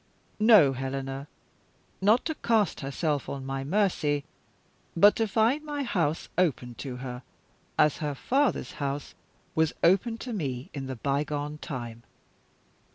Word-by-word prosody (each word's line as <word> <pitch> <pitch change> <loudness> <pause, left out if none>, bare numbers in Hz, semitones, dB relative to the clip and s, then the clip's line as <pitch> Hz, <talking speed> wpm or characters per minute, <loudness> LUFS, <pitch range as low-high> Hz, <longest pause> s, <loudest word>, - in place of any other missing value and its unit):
"No, 210 - +7
Helena! 135 +1 -4 0.7
Not 215 +5 +4
to 320 - -1
cast 225 - +1
herself 145 +1 -2
on 135 -1 -5
my 135 0 -3
mercy 150 -4 +1 0.7
but 205 +5 +7
to 225 - +1
find 230 +8 +2
my 295 -2 -3
house 165 - 0
open 130 -8 +1
to 130 -3 -5
her, 125 -1 -6 0.6
as 150 - +4
her 150 -2 -2
father's 275 - +1
house 140 0 -3 0.4
was 160 -1 +2
open 195 +7 +3
to 245 +1 -6
me 135 - -4
in 135 -2 -5
the 130 - -4
bygone 145 +3 -2
time. 120 -7 -6
150 Hz, 135 wpm, -28 LUFS, 135-210 Hz, 0.7 s, No